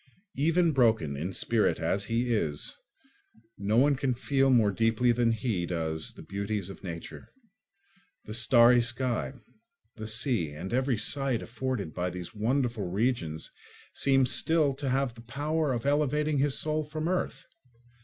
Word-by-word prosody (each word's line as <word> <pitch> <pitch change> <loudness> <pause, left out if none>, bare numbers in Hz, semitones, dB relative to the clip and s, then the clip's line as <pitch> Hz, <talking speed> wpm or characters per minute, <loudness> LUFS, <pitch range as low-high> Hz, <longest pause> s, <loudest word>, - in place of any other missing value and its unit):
Even 165 +4 +2
broken 110 - +2
in 80 +7 -3
spirit - - +1
as 100 +1 -1
he 120 +2 0
is, 75 -9 -1 0.8
no 105 +3 0
one 140 +3 +5
can 130 -2 -1
feel 135 +2 +1
more 115 -6 +4
deeply 115 +4 +2
than 120 -1 +2
he 105 -6 -1
does 80 -2 -2
the - - -12
beauties 100 -1 -3
of - - -13
nature. 85 -3 -8 0.9
The 105 - -7
starry 120 +1 +5
sky, 120 +2 -2 0.6
the 110 0 -5
sea, 110 - 0
and 95 +8 -6
every 130 -1 +1
sight 135 +2 0
afforded 115 - -4
by 90 0 -2
these 90 +3 -7
wonderful 115 -2 -1
regions 95 -6 -1 0.4
seem 135 -1 +3
still 150 +2 +2
to 135 0 -4
have 130 -1 0
the 115 - -13
power 145 +5 -1
of 120 -1 -3
elevating 150 +1 +1
his 140 0 +2
soul 155 0 0
from 155 +1 -4
earth. 185 0 -2
120 Hz, 150 wpm, -28 LUFS, 100-135 Hz, 0.9 s, one